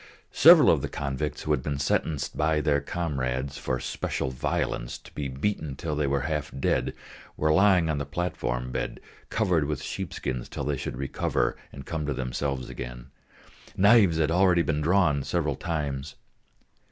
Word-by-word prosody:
Several - - +8
of - - +2
the - - -3
convicts 70 +1 -3
who 75 - -1
had 75 -4 +2
been 70 +1 -3
sentenced 70 +1 -1
by 75 0 +2
their 70 -1 +2
comrades, 70 -5 -3
for 65 - -2
special 65 - -3
violence, 65 -2 -2
to - - -17
be 70 -2 -3
beaten 70 +1 -2
till 75 +2 -3
they 75 -1 0
were 70 0 +1
half 75 -1 -2
dead, - - 0 0.4
were 75 0 +2
lying 95 -2 +5
on 75 -2 0
the 70 - -3
platform 65 -6 -2
bed, - - -3 0.3
covered 90 -9 +1
with 75 0 -3
sheepskins 65 -2 -4
till - - -5
they 75 - 0
should - - -5
recover 70 0 -1 0.2
and 70 0 -10
come 75 -1 -3
to 75 - -1
themselves 65 +1 -3
again; - - -8 0.7
knives 100 -4 +6
had 80 -1 +2
already 90 -1 +4
been 75 -2 -1
drawn 85 -3 +3
several 75 0 -1
times. 70 -3 -3
75 Hz, 165 wpm, -27 LUFS, 70-80 Hz, 0.7 s, Several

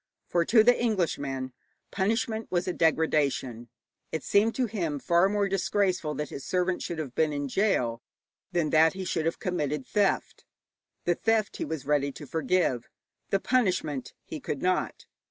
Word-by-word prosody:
For 170 -1 +1
to 220 +2 +6
the 245 +2 +6
Englishman 140 - -1 0.4
punishment 220 +2 -1
was 175 0 0
a 180 - 0
degradation. 145 -8 +1 0.4
It 160 - -3
seemed 215 +3 +3
to 255 - +1
him 175 -10 -2
far 170 +6 +3
more 205 -1 +1
disgraceful 190 -4 0
that 150 - -3
his 140 - -6
servant 180 0 0
should 170 - -4
have 145 -6 -5
been 155 +1 +2
in 145 -1 -2
gaol 125 - +1 0.5
than 165 -4 0
that 160 +1 +5
he 190 0 -5
should 160 -3 -1
have 165 - -1
committed 150 -6 -2
theft. 205 -2 0 0.6
The 175 - +2
theft 220 +3 0
he - - -2
was 155 -2 -5
ready 140 -1 +1
to 150 - -9
forgive, 160 -4 0 0.4
the 195 - +2
punishment 180 - 0
he - - -6
could - - -4
not. - - 0
170 Hz, 165 wpm, -28 LUFS, 145-195 Hz, 0.6 s, to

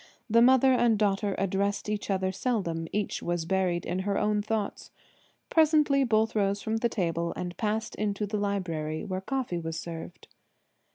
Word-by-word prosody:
The 230 0 +4
mother 260 +2 +6
and 240 -3 +3
daughter 200 -1 +1
addressed 195 +2 -1
each 210 -1 -3
other 190 -1 0
seldom: 185 -7 -2
each 210 0 -2
was 175 -1 -2
buried 180 -1 0
in 180 +2 -2
her 200 +1 -1
own 210 0 +1
thoughts. 215 -1 -3 0.6
Presently 300 -3 +4
both 225 -2 +2
rose 200 -1 +1
from 220 +1 -2
the 235 +1 +1
table 170 -5 -1
and 175 -1 -5
passed 220 +2 -2
into 210 0 -1
the 210 +1 -3
library, 180 -5 -2
where 185 -2 -3
coffee 240 -5 -2
was 165 0 -4
served. 170 +1 -8
200 Hz, 165 wpm, -28 LUFS, 180-220 Hz, 0.6 s, mother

